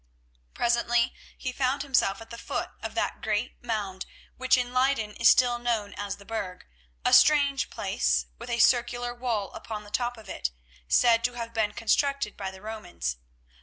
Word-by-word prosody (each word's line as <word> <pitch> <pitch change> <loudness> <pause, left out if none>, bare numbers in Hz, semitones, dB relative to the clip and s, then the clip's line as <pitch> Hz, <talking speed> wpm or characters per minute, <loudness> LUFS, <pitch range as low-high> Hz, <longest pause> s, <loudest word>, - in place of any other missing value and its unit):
Presently 240 0 +2 0.2
he 255 - -3
found 260 +2 0
himself 255 -7 +1
at 225 - -12
the 235 - -7
foot - - -3
of - - -5
that - - -1
great 220 +4 -2
mound 205 -5 -3 0.3
which 255 0 +3
in 245 0 -2
Leyden 255 -4 +2
is 235 - +6
still 245 -1 +4
known 225 -4 -1
as 205 -1 -4
the 200 - -15
Burg, 195 -5 -5 0.4
a - - +3
strange 285 -2 +5
place - - 0
with 235 - -8
a 235 - 0
circular 245 0 +3
wall 235 -6 -2
upon 215 -1 -6
the 205 - -14
top 245 0 -1
of 220 - -13
it, 65 - -2 0.4
said 230 - +4
to 245 - 0
have 230 -1 -6
been 215 -2 0
constructed 275 +1 +1
by 195 -1 -4
the 190 +1 -13
Romans. 180 - -4
235 Hz, 175 wpm, -27 LUFS, 210-245 Hz, 0.4 s, is